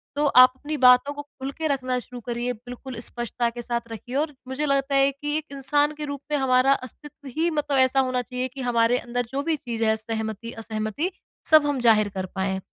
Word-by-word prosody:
तो 295 Hz, +1 st, +1 dB
आप 255 Hz, -2 st, +8 dB
अपनी 295 Hz, +3 st, -5 dB
बातों 250 Hz, +3 st, +6 dB
को 290 Hz, -, -6 dB
खुल 275 Hz, -2 st, -8 dB
के 320 Hz, -1 st, -1 dB
रखना 255 Hz, -3 st, -1 dB
शुरू 245 Hz, 0 st, -10 dB
करिए, 240 Hz, +1 st, -2 dB
बिल्कुल 245 Hz, +2 st, -9 dB
स्पष्टता 240 Hz, 0 st, -1 dB
के 240 Hz, +1 st, -7 dB
साथ 235 Hz, 0 st, -2 dB
रखिए। 225 Hz, +3 st, -7 dB
और 295 Hz, +2 st, 0 dB
मुझे 260 Hz, +3 st, -2 dB
लगता 275 Hz, -1 st, +1 dB
है 275 Hz, 0 st, +4 dB
कि 295 Hz, +2 st, -4 dB
एक 310 Hz, -, -4 dB
इंसान 290 Hz, +2 st, +1 dB
के 300 Hz, -, -4 dB
रूप 285 Hz, -1 st, -5 dB
में 295 Hz, -, +2 dB
हमारा 265 Hz, 0 st, +4 dB
अस्तित्व 285 Hz, +2 st, -12 dB
ही 335 Hz, +2 st, +2 dB
मतलब 295 Hz, -2 st, 0 dB
ऐसा 260 Hz, +1 st, +4 dB
होना 255 Hz, -1 st, +1 dB
चाहिए 250 Hz, +1 st, -3 dB
कि 270 Hz, -, -7 dB
हमारे 235 Hz, +1 st, +3 dB
अंदर 245 Hz, 0 st, -3 dB
जो 275 Hz, -, 0 dB
भी 325 Hz, 0 st, +1 dB
चीज़ 235 Hz, -4 st, -4 dB
है 220 Hz, -, +3 dB
सहमति, 220 Hz, 0 st, -4 dB
असहमति 225 Hz, -, -3 dB, 0.4 s
सब 310 Hz, -2 st, +7 dB
हम 285 Hz, -2 st, 0 dB
ज़ाहिर 215 Hz, -3 st, +4 dB
कर 190 Hz, -1 st, -2 dB
पाएँ। 190 Hz, 0 st, -1 dB
255 Hz, 215 wpm, -24 LUFS, 235-285 Hz, 0.4 s, आप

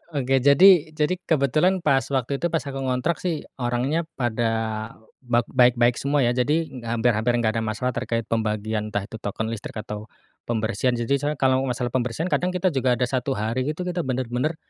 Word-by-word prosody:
Oke 135 Hz, -1 st, +2 dB
jadi 155 Hz, +4 st, +6 dB
jadi 155 Hz, +4 st, +1 dB
kebetulan 160 Hz, +5 st, +2 dB
pas 135 Hz, -, +4 dB, 0.2 s
waktu 135 Hz, +2 st, -1 dB
itu 175 Hz, -, +1 dB
pas 165 Hz, -2 st, -1 dB
aku 135 Hz, -1 st, -5 dB
ngontrak 130 Hz, +5 st, -1 dB
sih 170 Hz, -4 st, -2 dB, 0.2 s
orangnya 130 Hz, +7 st, -1 dB
pada 120 Hz, -2 st, 0 dB, 0.7 s
bak 120 Hz, -2 st, +1 dB
baik-baik 120 Hz, -2 st, +4 dB
semua 140 Hz, -1 st, +1 dB
ya 120 Hz, -, +3 dB
jadi 145 Hz, +7 st, +1 dB, 0.2 s
hampir 120 Hz, +1 st, +2 dB
hampir 115 Hz, +3 st, +1 dB
nggak 115 Hz, -1 st, +1 dB
ada -, -, -2 dB
masalah 110 Hz, +4 st, -2 dB
terkait 115 Hz, -1 st, -2 dB
pembagian 110 Hz, -1 st, -2 dB
entah 105 Hz, -2 st, -2 dB
itu 110 Hz, +2 st, -9 dB
token 110 Hz, +2 st, -3 dB
listrik 115 Hz, 0 st, -7 dB
atau 105 Hz, 0 st, -7 dB, 0.4 s
pembersihan, 120 Hz, +2 st, 0 dB
jadi 120 Hz, +2 st, -3 dB
saya 145 Hz, +1 st, -1 dB
kalau 130 Hz, -1 st, +2 dB
masalah 125 Hz, -1 st, -2 dB
pembersihan 130 Hz, +7 st, -2 dB
kadang 180 Hz, +1 st, 0 dB
kita 180 Hz, 0 st, +1 dB
juga 130 Hz, -3 st, +1 dB
ada 125 Hz, -, -1 dB
1 130 Hz, +2 st, -1 dB
hari 115 Hz, +6 st, -2 dB
itu 155 Hz, +4 st, -3 dB
kita 180 Hz, -1 st, -3 dB
bener-bener, 130 Hz, +2 st, -1 dB
125 Hz, 185 wpm, -24 LUFS, 115-145 Hz, 0.7 s, jadi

